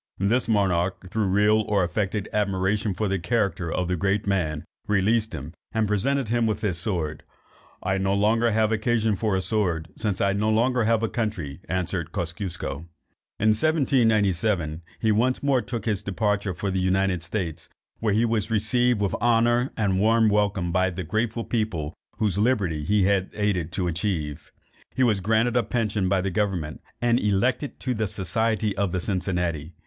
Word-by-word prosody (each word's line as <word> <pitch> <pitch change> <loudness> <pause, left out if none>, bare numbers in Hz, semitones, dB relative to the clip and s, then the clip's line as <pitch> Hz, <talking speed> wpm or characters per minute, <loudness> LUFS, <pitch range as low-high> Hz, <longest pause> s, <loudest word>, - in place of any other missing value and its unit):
This 110 +6 +1
monarch, 95 -3 0
through 110 -1 0
real 105 +3 +3
or 100 -3 +2
affected 100 +3 -1
admiration 100 0 0
for 105 - -1
the 95 -1 0
character 95 -3 -1
of 90 0 -1
the 90 - 0
great 100 +3 0
man, 85 -7 -1 0.2
released 105 +2 +2
him, 75 +1 -6 0.2
and 110 -1 +1
presented 120 +5 0
him 120 -1 +2
with 110 - -1
his 95 -7 0
sword: 85 -6 -2 0.6
"I 95 - 0
have 95 - 0
no 95 +1 +1
longer 110 +3 +3
occasion 110 0 +1
for 105 0 0
a 95 - 0
sword, 90 -8 0
since 105 -4 -2
I 100 - +2
have 100 - 0
no 105 +1 +1
longer 125 +3 +2
a 115 0 +2
country," 95 - -3
answered 90 -2 -2
Kosciusko. 85 -3 -4 0.5
In 110 - +3
1797 110 - +2 0.2
he 110 - +2
once 125 +6 +1
more 135 -3 +3
took 120 -4 -5
his 105 -4 0
departure 100 -1 -1
for 100 +1 -2
the 95 - 0
United 95 -1 +1
States, 85 -2 -4 0.3
where 110 -2 0
he 115 +2 +3
was 110 -2 0
received 115 +1 +2
with 100 - 0
honour 120 +2 +3
and 95 -4 +1
warm 110 +1 +4
welcome 100 -4 +1
by 95 +2 +2
the 90 +1 -5
grateful 110 +6 -1
people 95 -11 -2 0.2
whose 100 -3 0
liberty 100 -10 +1
he 105 +5 +2
had 95 0 +2
aided 100 -6 0
to 90 -3 -1
achieve. 85 -4 -3 0.4
He 130 - +2
was 110 -5 +3
granted 110 +5 +1
a 120 - +4
pension 105 -6 -1
by 95 -1 +2
the 95 0 -2
government, 90 -6 -2 0.2
and 120 0 +3
elected 120 +7 0
to 130 - -1
the 110 -2 -1
society 105 +3 -1
of 100 -3 -1
the 90 - 0
Cincinnati. 90 -5 -2
105 Hz, 175 wpm, -25 LUFS, 90-110 Hz, 0.6 s, warm